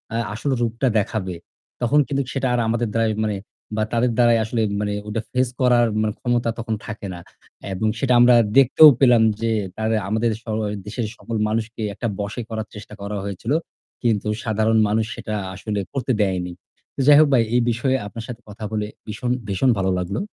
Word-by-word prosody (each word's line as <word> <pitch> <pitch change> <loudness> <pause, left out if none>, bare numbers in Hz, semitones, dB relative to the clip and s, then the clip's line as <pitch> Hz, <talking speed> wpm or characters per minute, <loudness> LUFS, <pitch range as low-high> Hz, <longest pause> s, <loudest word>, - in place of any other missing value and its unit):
আ - - +1 0.2
আসল 125 +6 -2
রূপটা 120 +3 0
দেখাবে, 95 -3 -3 0.5
তখন 135 +5 +3
কিন্তু 140 0 0
সেটা 135 -1 0
আর 125 - +1
আমাদের 115 +1 0
দ্বারাই 115 -1 +1
মানে 105 -2 -1 0.4
বা 110 - +1
তাদের 120 +1 +2
দ্বারাই 120 -1 +5
আসলে 110 +1 -1 0.2
মানে 105 0 -1
ওটা 105 +1 -2
ফেস 130 0 +2
করার 120 -2 +4
মানে 110 -1 0
ক্ষমতা 120 -1 0
তখন 115 -1 -2
থাকে 110 -2 -6
না। 85 - -8 0.5
এবং 95 +4 -1
সেটা 125 -2 +2
আমরা 120 0 +7 0.2
দেখতেও 135 +4 +8
পেলাম 125 -4 +5 0.2
যে 115 0 +1 0.3
তারে 110 0 0
আমাদের 110 +2 +1
সময় 110 -2 -2
দেশের 110 +2 -3
সকল 115 - -6
মানুষকেই 110 0 -2
একটা 115 +4 -3
বশে 105 +4 -3
করার 110 -1 -4
চেষ্টা 105 0 -10
করা 100 +1 -4
হয়েছিল। 100 +5 -4 0.5
কিন্তু 110 -3 +1 0.2
সাধারণ 110 0 +1
মানুষ 110 +1 +1
সেটা 110 - -5 0.2
আসলে 105 +2 -3
করতে 130 -2 -1
দেয়নি। 90 -3 0 0.4
তো - - -11
যাই 145 -1 +9
হোক 155 - +6
ভাই, 120 -3 +5
এই 125 - +4
বিষয়ে 130 +3 0
আপনার 115 +2 -8
সাথে 120 -1 -8
কথা 105 +1 -10
বলে 105 -1 -2 0.2
ভীষণ, 115 +3 -3 0.2
ভীষণ 100 +6 +1
ভালো 95 -1 +1
লাগলো। 90 +2 -2
110 Hz, 185 wpm, -22 LUFS, 105-120 Hz, 0.5 s, যাই